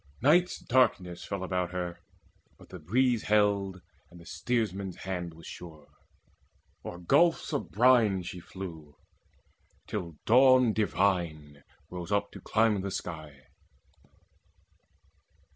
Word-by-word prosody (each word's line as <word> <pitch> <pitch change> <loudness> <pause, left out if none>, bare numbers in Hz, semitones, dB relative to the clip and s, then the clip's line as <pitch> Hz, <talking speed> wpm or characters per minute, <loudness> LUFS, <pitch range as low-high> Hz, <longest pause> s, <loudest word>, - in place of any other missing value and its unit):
Night's 175 +7 +3
darkness 105 -9 +1
fell 100 -2 -4
about 90 -1 -1
her, 90 -1 -4 0.6
but - - -17
the 90 - -9
breeze 120 +8 +1
Held, 100 -3 +1 0.3
and 90 - -15
the 85 - -14
steersman's 100 -5 -2
hand 85 -3 -4
was 80 - -14
sure. 80 -4 -11 0.9
O'er 85 - -7
gulfs 165 - +2
Of 145 - -2
brine 110 -5 +4
she 90 +1 -7
flew, 80 -5 -9 0.9
till 85 -6 -5
Dawn 130 -1 +6
divine 85 -8 -1 0.3
rose 90 +1 -6
up 100 0 0
To - - -11
climb 110 -2 +2
the 100 - -3
sky. 80 -7 -7
95 Hz, 115 wpm, -29 LUFS, 85-110 Hz, 0.9 s, Dawn